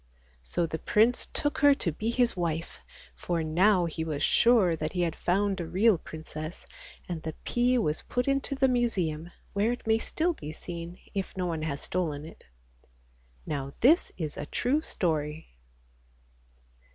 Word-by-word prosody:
So 115 - -1
the 160 0 -4
prince 235 +3 +3
took 290 - -1
her 285 -2 +6
to 175 - -1
be 215 +9 -3
his 240 -1 +2
wife, 170 -2 -3 0.3
for 170 -2 -2
now 180 +4 +4
he 160 -1 -3
was 155 -3 -2
sure 225 -8 +4
that 155 -1 -3
he 180 - 0
had 170 -2 0
found 195 +1 +1
a 165 - -4
real 195 +1 +3
princess, 155 +1 -7 0.4
and 170 -3 -4
the 160 -1 -5
pea 245 +1 +2
was 155 -10 0
put 245 +1 -2
into 275 0 0
the 270 0 +3
Museum, 185 -11 0 0.2
where 205 +4 +2
it 245 - -5
may 220 0 +3
still 340 +8 0
be 155 - -7
seen 170 +1 -7 0.2
if 195 -1 -4
no 180 - 0
one 165 -3 -2
has 150 -2 -3
stolen 155 -5 -2
it. 160 - -12 1.0
Now 140 -2 -3
this 310 +9 +5
is 155 -5 -4
a - - -5
true 275 +5 +1
story. 155 - -2
175 Hz, 165 wpm, -28 LUFS, 160-235 Hz, 1.0 s, her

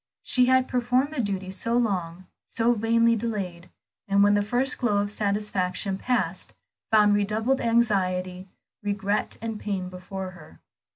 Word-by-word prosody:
She 250 -1 +3
had 260 0 +4
performed 250 +4 +1
the 280 - -1
duty 195 -3 -3
so 230 +5 -1
long, 185 -6 -1 0.2
so 235 +1 +1
vainly 230 +1 +3
delayed, 195 -6 -4 0.4
and 200 0 +4
when 205 0 +5
the 205 - +3
first 245 +7 0
glow 220 -5 +1
of 205 0 0
satisfaction 200 -2 -1
passed, 190 -8 -2 0.4
found 210 -2 +5
redoubled 215 +6 +1
anxiety, 190 -6 0 0.3
regret, 205 0 -1
and 225 -2 -4
pain 190 -3 -3
before 185 +1 -7
her. 155 - -15
205 Hz, 140 wpm, -25 LUFS, 190-230 Hz, 0.4 s, when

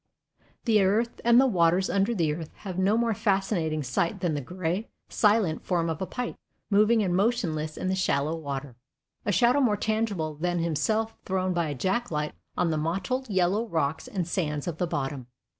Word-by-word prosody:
The 220 -4 +4
earth 215 +5 +1
and 235 +1 +6
the 265 - +6
waters 180 -4 +3
under 200 +5 +1
the 160 -6 +1
earth 160 0 -6 0.2
have 185 -2 -3
no 200 +4 +3
more 230 -1 +2
fascinating 190 -7 0
sight 135 +6 -1
than 175 -4 0
the 145 - -2
gray, 180 - -3 0.2
silent 210 -7 +2
form 170 -3 0
of 160 - -5
a 190 - -2
pike, 245 -1 -4 0.3
moving 215 +2 +4
and 180 -2 0
motionless 175 -8 0
in - - -3
the 190 - +1
shallow 155 -5 +1
water, 140 -5 -5 0.5
a - - +3
shadow 240 +9 +4
more 215 -6 +3
tangible 210 -8 -1
than 175 +4 -1
himself 175 +8 0
thrown 185 -1 0
by 170 -2 0
a 145 - -3
jack 190 - -1
light 150 -1 -2 0.2
on 170 -2 +2
the 155 - 0
mottled 190 +11 -2
yellow 195 +4 +1
rocks 160 - -1
and 190 -9 -3
sands 150 -5 -2
of 170 -2 -4
the 180 - +1
bottom. 135 -4 -3
185 Hz, 190 wpm, -27 LUFS, 160-215 Hz, 0.5 s, and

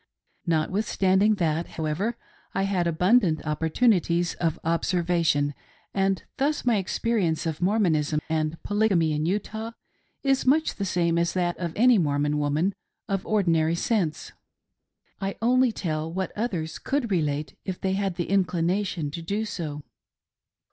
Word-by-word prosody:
Notwithstanding 190 +4 +2
that, 165 -3 0
however, 170 +9 -1 0.4
I 195 - +1
had 190 -3 0
abundant 180 0 +2
opportunities 170 +2 +2
of 165 -3 -1
observation; 165 -3 +1 0.4
and 195 -1 +1
thus 290 +1 0
my 240 -3 +3
experience 190 -4 0
of 160 +1 -3
Mormonism 170 -7 +2
and 155 0 -1
Polygamy 200 -7 +2
in 150 +2 -1
Utah 220 +4 -3 0.5
is 270 -1 +2
much 305 +5 +3
the 200 - -2
same 170 -2 +1
as 170 0 0
that 175 -1 0
of 170 -2 -2
any 240 -1 +5
Mormon 145 -1 +1
woman 150 +7 +1 0.3
of 195 -2 -2
ordinary 170 -6 +2
sense; 170 -5 -1 0.9
I 195 0 -3
only 250 +2 +3
tell 160 -5 -3
what 190 +2 -3
others 185 -8 -3
could 265 -5 -1
relate 150 -4 -1
if 185 -2 -4
they 190 0 0
had 195 -2 -1
the 175 - -2
inclination 180 -3 0
to 170 - -6
do 200 +6 -2
so. 150 -7 -5
180 Hz, 135 wpm, -26 LUFS, 160-205 Hz, 0.9 s, any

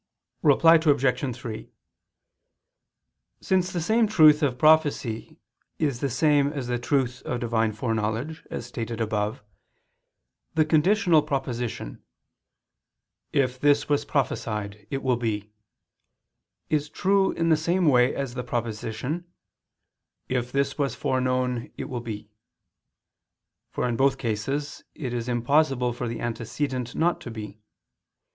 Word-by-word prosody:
Reply 165 +3 +6
Obj. 135 -3 +2
3: 115 -3 -7 1.7
Since 185 -1 +1
the 175 - -2
same 220 +7 +2
truth 155 -7 +6
of 135 -4 +1
prophecy 145 -6 +2 0.4
is 140 -6 -1
the 140 - -1
same 145 +2 +3
as 140 -4 -4
the 120 0 -1
truth 125 -1 0
of 125 - -3
Divine 115 -2 +1
foreknowledge, 115 +7 -2
as - - -5
stated 115 -1 -5
above, 105 -1 -2 1.1
the 155 -1 +4
conditional 170 +1 +4
proposition: 125 - -4 1.3
"If 130 -2 +1
this 145 +1 +3
was 145 -1 +2
prophesied, 105 -6 -2
it 135 -1 -3
will 130 -2 +2
be," 105 -3 -3 1.2
is 150 -1 0
true 195 +1 +2
in 165 0 0
the 160 - +6
same 170 +4 +1
way 125 -3 +4
as 135 -3 -3
the 125 - -4
proposition: 120 +9 -4 1.0
"If 125 -1 -2
this 140 +2 -1
was 140 -2 0
foreknown, 125 -2 -1
it - - -4
will 125 -2 -4
be": 110 -2 -7 1.4
for - - -2
in 120 -2 -1
both 135 +1 +3
cases 135 +5 -3
it 130 -6 -4
is 120 0 -3
impossible 125 0 +2
for 120 0 -4
the 115 0 -5
antecedent 120 +2 -3
not 170 +2 +1
to - - -7
be. 110 -2 -8
130 Hz, 125 wpm, -25 LUFS, 115-150 Hz, 1.7 s, Reply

